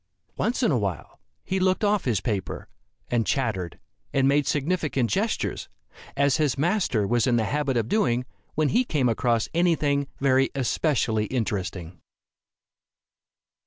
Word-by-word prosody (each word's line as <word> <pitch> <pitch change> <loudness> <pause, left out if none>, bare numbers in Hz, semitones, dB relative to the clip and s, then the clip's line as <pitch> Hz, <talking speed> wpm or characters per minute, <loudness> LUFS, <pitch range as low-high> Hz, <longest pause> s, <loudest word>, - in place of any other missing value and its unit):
Once 245 +2 -1
in 230 - +3
a 125 - +2
while 95 -7 -4 0.2
he 190 - -1
looked 185 +2 +1
off 205 -1 +2
his 110 -7 +1
paper, 100 -2 -3 0.4
and 115 -3 0
chattered, 105 - -1 0.3
and 135 -1 +2
made 140 0 +2
significant 145 -5 0
gestures, 215 +3 -1 0.5
as 140 -2 +3
his 145 -4 +1
master 160 - +1
was 120 +3 +1
in 120 - +3
the 115 - +2
habit 140 +2 0
of 115 -2 0
doing, 125 - +1 0.3
when 155 -1 +2
he 245 +3 +3
came 150 - 0
across 115 -1 +1
any 170 0 +3
thing 140 -2 0
very 135 -1 +3
especially 125 -5 0
interesting. 95 -7 -3
135 Hz, 145 wpm, -25 LUFS, 115-155 Hz, 0.5 s, in